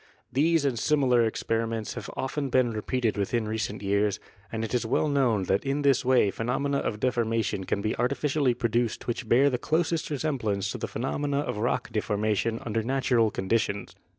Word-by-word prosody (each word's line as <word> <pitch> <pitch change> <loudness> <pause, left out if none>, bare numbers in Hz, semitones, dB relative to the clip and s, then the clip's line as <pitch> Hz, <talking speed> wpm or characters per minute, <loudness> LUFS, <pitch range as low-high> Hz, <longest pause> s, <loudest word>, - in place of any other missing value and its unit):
These 155 +2 +3
and 125 -4 0
similar 125 -6 +3
experi 115 +1 -1
ments 115 -2 -3
have - - -6
been - - -10
often 135 +1 -2 0.2
repeated 110 +1 -1
within 110 +3 0
recent 110 -2 -3
years, 100 +1 +1 0.3
and 115 0 -2
it 110 - -6
is 125 - +1
well 115 +6 +1
known 130 -8 +2
that 95 +2 +1
in 140 +1 -1
this 135 -2 +3
way 125 -6 +4
phenomena 135 +7 -1
of 105 - -3
deforma 115 -2 +1
tion 95 - -3
can 100 - -1
be 110 - 0
artificially 135 +1 +1
produced 115 -1 -1
which 120 -1 -3
bear 140 +4 +5
the 125 - -1
closest 165 +2 0
resemblance 115 -10 -1
to - - -5
the - - -3
phenomena 140 +4 -1
of 125 - -3
rock 120 +3 -1
deformation 110 +1 0
under 115 -1 0
natural 125 -2 +2
conditions. 100 0 -1
120 Hz, 180 wpm, -27 LUFS, 110-135 Hz, 0.3 s, bear